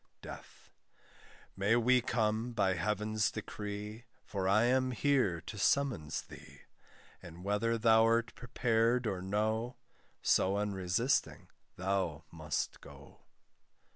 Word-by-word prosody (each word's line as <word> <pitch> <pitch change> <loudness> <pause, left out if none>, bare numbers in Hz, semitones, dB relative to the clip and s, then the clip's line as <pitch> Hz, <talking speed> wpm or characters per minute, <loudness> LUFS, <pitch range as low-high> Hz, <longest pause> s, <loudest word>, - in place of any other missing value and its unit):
DEATH. - - -11 0.8
May 100 +4 +2
we 125 +2 +4
come, 110 0 0
by 100 -4 +2
heaven's 105 +4 0
decree, 105 +1 -6 0.2
For 95 -2 -2
I 105 +3 +4
am 130 +1 +2
here 125 -8 +1
to 105 - -8
summons 120 - +1
thee; - - -14 0.6
And 85 +1 -11
whether 105 +4 0
thou'rt 115 +1 +4
prepared 120 0 +1
or 95 -4 -2
no, 110 +5 -1 0.5
So 95 +2 +3
unresisting 100 +4 0 0.3
thou 90 -5 -1
must 80 -2 -3
go. - - -14
110 Hz, 105 wpm, -33 LUFS, 95-115 Hz, 0.8 s, we